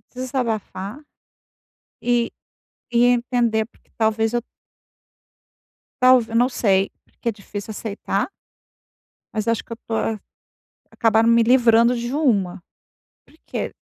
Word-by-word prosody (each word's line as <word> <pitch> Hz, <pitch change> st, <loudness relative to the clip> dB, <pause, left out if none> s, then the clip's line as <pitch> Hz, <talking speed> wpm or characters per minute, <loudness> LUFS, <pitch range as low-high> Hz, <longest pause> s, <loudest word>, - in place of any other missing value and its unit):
desabafar 235 Hz, -3 st, -3 dB, 1.0 s
e 240 Hz, -1 st, +1 dB, 0.6 s
e 240 Hz, +1 st, +4 dB
entender 240 Hz, -2 st, +2 dB
porque 235 Hz, -, -31 dB
talvez 220 Hz, +1 st, +1 dB
eu 240 Hz, -, +1 dB, 1.6 s
talv 255 Hz, -2 st, +6 dB
eu 225 Hz, -, -2 dB
não 245 Hz, +2 st, +4 dB
sei, 195 Hz, -6 st, +2 dB, 0.2 s
porque 235 Hz, -, -6 dB
é -, -, +1 dB
difícil 205 Hz, 0 st, -8 dB
aceitar. 205 Hz, -, -2 dB, 1.1 s
Mas 215 Hz, 0 st, -2 dB
acho 230 Hz, -, 0 dB
que -, -, -11 dB
eu -, -, -1 dB
estou 225 Hz, -1 st, -4 dB
a 220 Hz, -1 st, -1 dB, 0.7 s
acabaram 225 Hz, 0 st, +3 dB
me 235 Hz, 0 st, +5 dB
livrando 235 Hz, 0 st, +5 dB
de 240 Hz, +2 st, -4 dB
uma, 200 Hz, -, +1 dB, 0.6 s
porque -, -, -6 dB
230 Hz, 115 wpm, -22 LUFS, 215-245 Hz, 1.6 s, talv